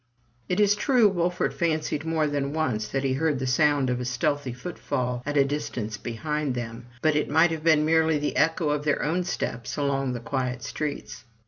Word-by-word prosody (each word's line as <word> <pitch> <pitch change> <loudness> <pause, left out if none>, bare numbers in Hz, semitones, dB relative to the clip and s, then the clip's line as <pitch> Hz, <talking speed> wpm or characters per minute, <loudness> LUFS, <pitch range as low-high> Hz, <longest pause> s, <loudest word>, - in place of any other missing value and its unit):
It 180 - 0
is 205 -1 +5
true, 230 +2 +4
Wolfert 180 -2 0
fancied 155 -2 -1
more 160 -1 +1
than 145 -1 -1
once 125 -9 -1
that 135 +5 -2
he 135 -1 +1
heard 150 +1 +1
the 130 - -3
sound 145 +1 +3
of 125 0 0
a 125 - -3
stealthy 130 +2 -1
footfall 125 -2 -3
at 145 0 0
a 140 - +5
distance 125 -6 -3
behind 140 +5 -3
them; 120 0 -6 0.2
but 155 -1 +3
it 150 - 0
might 160 +3 +4
have 160 -1 -4
been 155 -2 +4
merely 160 0 +3
the 145 0 -2
echo 160 +1 +2
of 145 0 0
their 150 -1 +1
own 170 +4 0
steps 120 -9 -4
along 135 -2 0
the 120 - -4
quiet 125 0 -3
streets. 145 -9 -5
145 Hz, 200 wpm, -26 LUFS, 125-160 Hz, 0.2 s, is